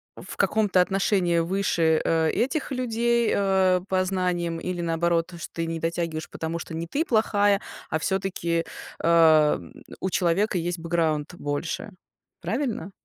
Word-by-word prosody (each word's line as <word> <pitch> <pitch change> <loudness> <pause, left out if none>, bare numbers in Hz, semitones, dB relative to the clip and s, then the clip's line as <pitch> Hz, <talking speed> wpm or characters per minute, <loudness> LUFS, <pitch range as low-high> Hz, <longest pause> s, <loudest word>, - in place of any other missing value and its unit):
в - - -9
каком-то 205 -4 +3
отношении 185 -2 +1
выше, 165 -2 +1
э, 160 -1 +2
этих 280 +4 -1
людей, 235 -2 +1
а, 190 -2 +3
по 185 -1 +1
знаниям, 180 -3 -1
или 180 0 -3
наоборот, 170 +1 0
что - - -6
ты 165 - -2
не 165 0 -3
дотягиваешь, 165 -1 -3
потому 165 +1 -4
что 165 - -8
не 165 +1 -4
ты 295 - -1
плохая, 205 -4 +2 0.3
а 155 - 0
всё-таки, 170 -2 -1 0.4
ам, 155 - +4 0.3
у 190 - 0
человека 185 +3 +1
есть 175 0 -2
бэкграунд 165 -1 -1
больше, 150 +7 -4 0.5
правильно? 225 - -2
175 Hz, 140 wpm, -25 LUFS, 165-195 Hz, 0.5 s, ам